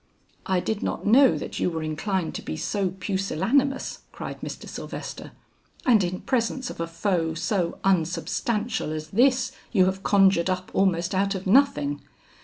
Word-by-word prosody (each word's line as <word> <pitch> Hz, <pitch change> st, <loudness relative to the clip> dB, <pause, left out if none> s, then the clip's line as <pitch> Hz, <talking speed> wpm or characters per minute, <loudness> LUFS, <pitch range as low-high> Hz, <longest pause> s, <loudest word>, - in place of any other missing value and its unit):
"I 190 Hz, -1 st, +2 dB
did 210 Hz, +3 st, -2 dB
not -, -, -3 dB
know 255 Hz, +6 st, +6 dB
that -, -, -5 dB
you -, -, +1 dB
were 160 Hz, -2 st, -4 dB
inclined 165 Hz, +3 st, -2 dB
to -, -, -5 dB
be 80 Hz, -, -5 dB
so 195 Hz, -, -1 dB
pusillanimous," 195 Hz, -, 0 dB
cried -, -, -7 dB
Mr. -, -, -7 dB
Sylvester; -, -, -7 dB, 0.5 s
"and 225 Hz, -6 st, +5 dB
in 180 Hz, +1 st, -3 dB
presence 255 Hz, +1 st, -1 dB
of -, -, -11 dB
a 165 Hz, -, -2 dB
foe 165 Hz, -1 st, -1 dB
so 170 Hz, +1 st, -1 dB
unsubstantial 195 Hz, +4 st, 0 dB
as 155 Hz, 0 st, -5 dB
this 255 Hz, +4 st, +3 dB, 0.2 s
you 190 Hz, -5 st, +4 dB
have 190 Hz, +1 st, -1 dB
conjured 195 Hz, -3 st, +4 dB
up 185 Hz, 0 st, -2 dB
almost 180 Hz, -2 st, +1 dB
out 195 Hz, +1 st, +1 dB
of 190 Hz, -, -5 dB
nothing. 185 Hz, -, +3 dB
190 Hz, 160 wpm, -25 LUFS, 170-215 Hz, 0.5 s, know